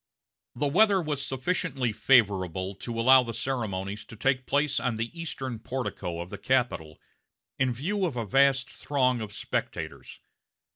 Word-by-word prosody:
The 145 - -1
weather 195 +7 +4
was 150 -5 -2
sufficiently 135 -2 -1
favorable 95 -7 +2
to 115 +4 -5
allow 130 +3 +7
the 115 -2 -5
ceremonies 105 -5 -3
to - - -11
take 130 +3 0
place 145 -1 +2
on 120 -1 -1
the 115 +8 -4
eastern 135 -8 -4
portico 115 -9 -4
of 85 +1 -6
the - - -6
Capitol, 120 - 0 0.6
in 130 -1 +2
view 180 - -1
of 135 -7 -5
a 115 - -1
vast 135 +5 +3
throng 130 -4 0
of 105 -2 -5
spectators. - - -4
125 Hz, 150 wpm, -28 LUFS, 110-140 Hz, 0.6 s, allow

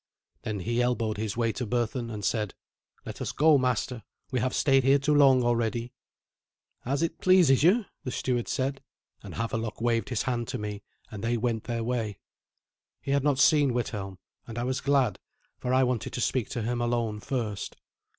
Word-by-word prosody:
Then 105 -3 -4
he 120 +5 0
elbowed 115 -3 0
his 110 0 -3
way 115 -1 +1
to 120 +1 -4
Berthun, 120 +1 -1
and 105 -3 -5
said, 105 -4 -1 0.5
"let - - -7
us - - -2
go, 155 -1 +5
master; 125 -1 -1 0.3
we 130 - 0
have 130 +2 -1
stayed 135 -2 +3
here 135 +2 +5
too 140 +2 +1
long 135 -3 +6
already." 120 0 0 0.9
"As 140 +5 0
it 165 0 -3
pleases 180 -9 +5
you," 200 +8 +4 0.2
the 130 - -3
steward 125 -1 -1
said; 135 +1 -2 0.4
and - - -9
Havelok 115 -1 -3
waved 115 +2 0
his 125 -4 -1
hand 120 -2 -2
to 130 - -3
me, 105 -2 -5 0.3
and 105 -1 -7
they 120 +1 +1
went 115 -1 -1
their 115 -1 -2
way. 115 -4 -2 0.8
He 135 - -4
had 140 -1 +2
not 145 -2 +2
seen 140 -2 +4
Withelm, 100 -5 -3 0.3
and 115 0 -7
I 120 - -1
was 130 +1 -1
glad, 140 -2 +2 0.4
for 125 - -2
I 130 +1 +4
wanted 125 -3 -1
to 125 - -3
speak 125 0 0
to 120 - -3
him 120 +2 -1
alone 120 -3 -1
first. 110 -4 -3
120 Hz, 190 wpm, -28 LUFS, 115-130 Hz, 0.9 s, long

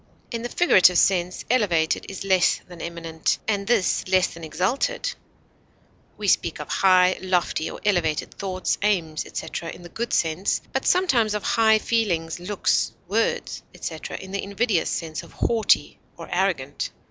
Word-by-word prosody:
In 230 -2 -3
the 240 - -4
figurative 190 - +5
sense, 180 -1 +2
elevated 175 -10 +1
is 195 -1 -6
less 185 -3 +3
than 175 -2 -11
eminent, 165 -1 -2
and 200 -2 -1
this 235 -6 +2
less 185 -1 +4
than 170 - -11
exalted; 255 - -1 1.0
we - - -4
speak - - +2
of - - -6
high, 185 -1 +4
lofty, 180 -3 0
or - - -8
elevated 170 -7 0
thoughts, 185 -1 -2
aims, 175 -7 0
etc., 165 - -5
in 175 - -10
the 175 - -10
good 235 +6 -4
sense, 165 +4 +1
but 265 - -1
sometimes 250 - +3
of 210 - -3
high 220 -1 +4
feelings, 180 -9 -1
looks, 195 +3 0
words, 220 +5 -1
etc., - - -6
in 190 - -10
the 200 - -2
invidious 200 -3 0
sense 160 -2 -3
of - - -15
haughty 225 -2 +1 0.2
or - - -9
arrogant. - - -1
190 Hz, 155 wpm, -24 LUFS, 170-220 Hz, 1.0 s, figurative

